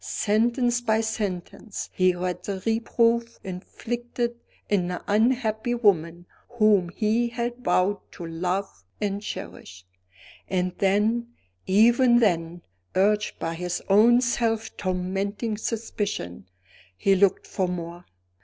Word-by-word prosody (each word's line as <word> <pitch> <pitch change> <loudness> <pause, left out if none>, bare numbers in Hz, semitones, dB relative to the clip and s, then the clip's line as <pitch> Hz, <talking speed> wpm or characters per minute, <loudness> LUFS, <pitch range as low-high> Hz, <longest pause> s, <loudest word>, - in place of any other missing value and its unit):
Sentence 240 +3 +1
by 220 -2 +2
sentence 210 -1 -4
he 185 -1 +3
read 180 0 -3
the 195 -2 -4
reproof 230 +1 +1
inflicted 235 +6 -4 0.4
on 185 -4 +2
the 180 0 -4
unhappy 225 +1 +1
woman 175 -6 +1 0.3
whom 210 -5 +4
he 220 +5 +1
had 240 +1 -4
vowed 185 +2 +2
to 175 - -8
love 180 +4 -3 0.2
and 205 -1 -2
cherish. 90 - -8 0.6
And 180 -1 -1
then 210 +5 +2 0.4
even 240 +5 +5
then 175 -6 +1 0.3
urged 210 +2 +2
by 165 - -3
his 180 +1 -3
own 230 +5 +6
self 230 -2 -1
tormenting 195 +4 -2
suspicion, 205 - -4 0.5
he 195 - +3
looked 195 0 +3
for 190 -2 -1
more. 175 0 -6
205 Hz, 115 wpm, -25 LUFS, 180-230 Hz, 0.6 s, own